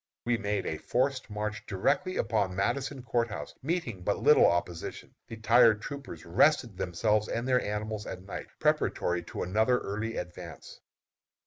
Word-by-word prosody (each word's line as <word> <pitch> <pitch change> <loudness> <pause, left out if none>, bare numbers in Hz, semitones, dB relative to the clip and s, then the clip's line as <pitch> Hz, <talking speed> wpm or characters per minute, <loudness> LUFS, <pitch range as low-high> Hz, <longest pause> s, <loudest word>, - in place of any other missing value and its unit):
We 120 0 +2
made 105 -3 -2
a 80 - -3
forced 130 +4 0
march 105 +1 -4
directly 185 - 0
upon 105 -5 0
Madison 135 +7 -1
Court 120 -1 +1
House, 105 - -7
meeting 145 - -2
but 100 +3 0
little 150 - +6
opposition. 85 -1 -2
The 115 - -8
tired 115 0 +5
troopers 140 - -8
rested 115 - +3
themselves 105 +4 0
and 115 +2 -2
their 125 -1 +3
animals 105 0 -3
at 95 0 -6
night, 95 - -7
preparatory 90 0 +1
to - - -4
another 110 +7 +2
early 110 +1 -4
advance. 90 0 -8
110 Hz, 150 wpm, -29 LUFS, 95-125 Hz, -, little